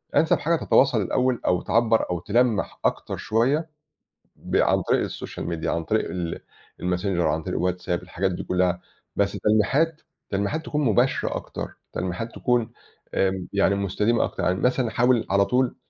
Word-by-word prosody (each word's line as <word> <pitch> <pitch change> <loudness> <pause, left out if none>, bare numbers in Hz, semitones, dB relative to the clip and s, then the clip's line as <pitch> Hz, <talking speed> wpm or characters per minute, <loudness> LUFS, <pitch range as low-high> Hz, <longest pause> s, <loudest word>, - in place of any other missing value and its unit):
أَنسَب 160 - +4
حاجة 170 +2 +1
تتواصل 135 -7 +3
الأول 125 +5 0
أو 90 -1 +2
تعَبّر 115 -1 +2
أو 90 -1 -1
تلَمّح 110 +2 +1
أكتر - - -1
شوية 135 +9 +1 0.7
ب - - -5
عن - - +3
طريق - - +1
الsocial - - -7
media 85 -2 -4
عن 85 - 0
طريق 110 +7 0
ال 85 -2 -4 0.4
الmessenger 90 +2 -1 0.2
عن 80 -1 0
طريق - - -3
الwhatsapp 90 +1 -2
الحاجات 95 +1 -2
دي 90 - -4
كُلّها 90 -1 0 0.3
بس 100 -1 +1
تلميحَات، 135 - +2 0.3
تلميحَات 100 +11 -1
تكون 150 -1 -1
مباشرة 110 -6 +2
أكتر - - -6 0.2
تلميحَات 95 +6 -4
تكون 120 -2 +1 0.4
آمم، 95 -1 0
يعني 100 0 +3
مستديمة 105 +4 +1
أكتر، - - -5
يعني 90 +1 +1
مثلًا 125 -1 +2
حاول 120 0 +2
على 100 +1 +4
طول 125 +4 +1
105 Hz, 160 wpm, -24 LUFS, 90-125 Hz, 0.7 s, أَنسَب